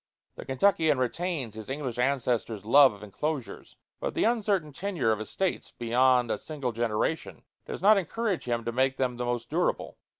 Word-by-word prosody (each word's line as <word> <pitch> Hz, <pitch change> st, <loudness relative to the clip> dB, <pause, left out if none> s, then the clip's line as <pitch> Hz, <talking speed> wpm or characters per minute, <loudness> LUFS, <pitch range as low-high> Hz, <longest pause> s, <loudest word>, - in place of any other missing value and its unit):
The -, -, -9 dB
Kentuckian 160 Hz, +1 st, +2 dB
retains 135 Hz, -, -2 dB
his 110 Hz, +1 st, -9 dB
English 130 Hz, -3 st, -4 dB
ancestors' 125 Hz, -5 st, 0 dB
love 140 Hz, +4 st, +7 dB
of 105 Hz, 0 st, -12 dB
enclosures; 135 Hz, +6 st, -5 dB, 0.2 s
but -, -, -3 dB
the -, -, +1 dB
uncertain 205 Hz, -9 st, +1 dB
tenure 175 Hz, -, -1 dB
of 110 Hz, -1 st, -1 dB
estates 185 Hz, -, -3 dB
beyond 125 Hz, 0 st, +3 dB
a -, -, -1 dB
single 140 Hz, -6 st, -4 dB
generation 115 Hz, +7 st, -2 dB, 0.2 s
does -, -, -6 dB
not 210 Hz, 0 st, +7 dB
encourage 200 Hz, +1 st, -2 dB
him 120 Hz, -2 st, -2 dB
to 115 Hz, -, -1 dB
make 130 Hz, +2 st, +1 dB
them 125 Hz, -2 st, -1 dB
the 125 Hz, -, -2 dB
most 120 Hz, 0 st, -3 dB
durable. 175 Hz, +3 st, -1 dB
130 Hz, 170 wpm, -28 LUFS, 120-160 Hz, 0.2 s, love